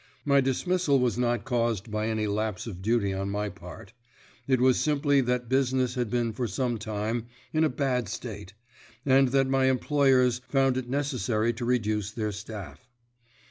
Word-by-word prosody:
My 140 -1 +4
dismissal 145 +3 +1
was 125 -2 +1
not 120 0 0
caused 115 -4 -1
by 110 +1 -1
any 110 -1 -1
lapse 105 0 -2
of 95 -6 -7
duty 105 -1 +1
on 95 +1 -3
my 105 +1 -2
part; 90 0 -11 0.5
it 130 -2 +3
was 130 0 +4
simply 145 -2 +2
that 125 -1 -1
business 130 -1 +1
had 125 -3 -2
been 120 -1 0
for 120 +2 -2
some 120 +3 -2
time 110 +2 -3 0.3
in 155 0 +3
a 155 - +3
bad 125 -5 -1
state, 100 -3 -7 0.5
and 135 0 +5
that 135 +1 +2
my 135 0 +2
employers 130 -2 +3
found 135 -2 +2
it 130 -1 -3
necessary 120 -5 0
to 120 +1 -5
reduce 110 -4 0
their 110 0 -3
staff. 105 +3 -9
120 Hz, 170 wpm, -27 LUFS, 110-130 Hz, 0.5 s, and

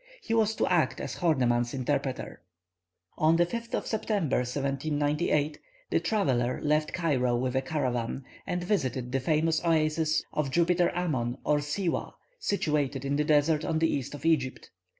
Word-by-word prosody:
He - - -2
was 220 -1 +2
to - - +1
act 175 -3 +1
as - - -5
Horneman's 125 -7 +1
interpreter. 135 0 -2 0.8
On 160 +1 +4
the 175 +1 +4
5th 235 +6 -4
of - - -2
September, 205 - 0
1798, 145 +3 0 0.3
the - - +3
traveller 130 - 0
left 150 +1 +1
Cairo 130 -8 +1
with 125 +1 -1
a 130 - +2
caravan, 130 -3 -2 0.2
and 180 0 -2
visited 130 - -1
the 135 - +1
famous 155 +4 +1
oasis 155 -1 +2
of 150 -3 0
Jupiter 175 +3 +2
Ammon 130 -9 -1
or 150 0 +2
Siwah, 165 +5 -2 0.3
situated 150 - 0
in 140 +1 0
the 150 - +2
desert 150 +1 +3
on 160 0 0
the 160 0 +2
east 140 0 -3
of 145 - -10
Egypt. 140 -6 0
150 Hz, 155 wpm, -28 LUFS, 135-165 Hz, 0.8 s, On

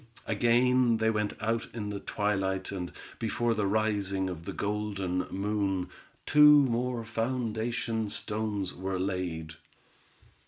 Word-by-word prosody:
Again 120 +2 +3
they 110 0 +2
went 105 -1 -1
out 115 +1 -1
in 105 -3 -3
the 100 - -4
twilight, 95 -3 -1
and 90 -3 -4 0.3
before 115 +1 0
the 105 -3 0
rising 100 -3 0
of 85 -1 -8
the - - -4
golden 100 -3 -2
moon, 100 -2 -1 0.4
two 150 0 +8
more 120 -1 -1
foundation 115 -1 -1
stones 105 -3 -3
were 95 +1 -3
laid. 90 -4 -3
105 Hz, 120 wpm, -29 LUFS, 95-115 Hz, 0.4 s, two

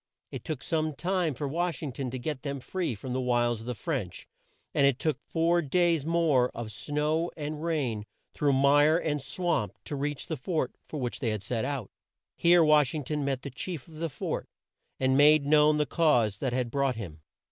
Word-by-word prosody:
It - - -6
took 155 -5 -4
some 155 -2 -1
time 175 -3 0
for 145 +4 -3
Wash 170 +2 -2
ing 145 - -3
ton 130 +1 -4
to 130 - -4
get 140 +1 -4
them 140 -1 -4
free 170 -1 -3
from 125 +5 -6
the 130 - 0
wiles 120 -2 +1
of 115 - -10
the 125 - -2
French, - - -4 0.5
and 140 - +4
it 135 -3 +2
took 155 +1 -1
four 170 +1 +2
days 165 0 +1
more 160 -7 +3
of 115 -2 -5
snow 150 +7 -1
and 150 0 -4
rain, 130 -11 -1 0.3
through 145 -2 +2
mire 145 +4 +5
and 150 -4 -1
swamp, 175 +5 -1
to 150 - -4
reach 145 0 -3
the 160 - -4
fort 155 -1 -2
for 150 - -5
which 125 -2 -3
they 120 - 0
had 105 -2 -3
set 115 +3 -2
out. 135 -6 -4 0.4
Here 170 0 +5
Wash 150 -2 +4
ing 150 - -3
ton 150 +2 -2
met 135 -2 -2
the 140 - -6
chief 150 +2 -6
of 160 -2 -13
the 165 +1 -2
fort - - -4 0.5
and 130 0 +2
made 145 +1 +6
known 150 +1 +5
the 150 - +2
cause 120 - +2
that 130 - -1
had 125 -1 -1
brought 140 -2 +1
him. 85 -9 -8
145 Hz, 210 wpm, -28 LUFS, 125-160 Hz, 0.5 s, made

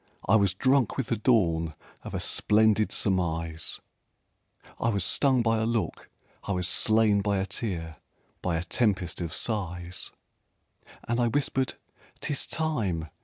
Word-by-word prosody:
I 110 - +5
was 100 -3 +3
drunk 130 +1 +2
with 135 -4 -2
the 115 - +2
dawn 85 -9 +1 0.3
Of - - -7
a - - -1
splendid 110 0 +3
surmise 80 -4 -1 1.0
I 115 - +1
was 100 -4 +1
stung 130 +2 +4
by 115 -1 +2
a 110 - 0
look, 115 -2 -2 0.3
I 100 - -2
was 90 -1 0
slain 110 +1 +3
by 100 0 0
a 95 - 0
tear, 85 -6 -4 0.4
by 85 -2 0
a 80 - -2
tempest 95 -5 0
of 85 -2 -3
sighs. 90 -5 -2 1.0
And 120 +1 0
I 120 - +3
whispered 130 +1 0 0.4
"'Tis 145 - -2
time! 105 - -1
100 Hz, 145 wpm, -27 LUFS, 90-115 Hz, 1.0 s, I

